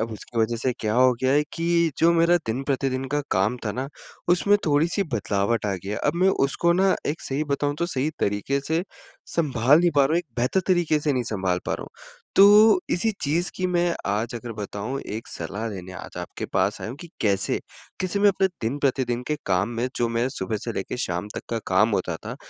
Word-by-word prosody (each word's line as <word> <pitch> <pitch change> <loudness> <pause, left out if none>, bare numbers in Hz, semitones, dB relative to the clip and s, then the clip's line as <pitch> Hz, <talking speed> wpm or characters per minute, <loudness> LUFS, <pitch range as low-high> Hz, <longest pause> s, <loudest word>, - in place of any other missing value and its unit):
अब 115 0 -2
उसकी 115 +2 -7
वजह 115 +1 +1
से 125 +2 0
क्या 110 0 -1
हो 130 0 +5
गया 130 +1 +3
है 145 +1 +4
कि 170 -1 +1
जो 170 +1 +5
मेरा 170 +1 +4
दिन-प्रतिदिन 135 +2 -1
का 145 - +2
काम 100 +6 +1
था 105 - -1
ना 130 +4 -4 0.4
उसमें 200 +4 +4
थोड़ी-सी 160 +6 +2
बदलावट 105 +1 0
आ 100 - 0
गई 95 +2 -8
है, 105 - -2
अब - - 0
मैं 185 +2 +3
उसको 170 +2 +2
ना 190 +2 +3
एक 150 +3 -2
सही 140 +3 -2
बताऊँ 145 0 -1
तो 170 - 0
सही 150 -2 0
तरीक़े 105 +8 0
से 160 +2 +1 0.5
सँभाल 140 -2 +4
नहीं 175 -1 +3
पा 140 - +6
रहा 135 - 0
हूँ, 165 - +3
एक 175 - -5
बेहतर 125 +10 +1
तरीक़े 175 -4 +3
से 150 -1 +1
नहीं 125 -2 0
सँभाल 95 -3 0
पा - - 0
रहा - - -6
हूँ। - - -10 0.5
तो 210 - +8
इसी 220 +6 +1
चीज़ 165 +5 0
की 185 - 0
मैं 175 -1 +1
आज 110 +4 -1
अगर 120 0 -6
बताऊँ 105 +5 -5
एक 110 +2 -6
सलाह 100 +7 -5
लेने 95 -3 -7
आज 90 - -9
आपके 90 - -6
पास - - 0
आया - - -5
हूँ 125 - -8
कि 175 - -9
कैसे, 100 -2 +1 0.4
कैसे 185 +2 -1
मैं 205 - +6
अपने 195 -1 +3 0.2
दिन 120 +6 -1
प्रतिदिन 130 -3 0
के 150 - 0
काम 95 +2 +1
में 125 +2 0
जो 120 - +1
मेरा 115 +2 0
सुबह 110 -5 -3
से 115 - -3
लेके 95 +3 -4
शाम 90 -5 -3
तक - - -3
का 115 - 0
काम 95 +4 +3
होता 90 -5 -1
था - - -5
130 Hz, 225 wpm, -24 LUFS, 110-165 Hz, 0.5 s, तो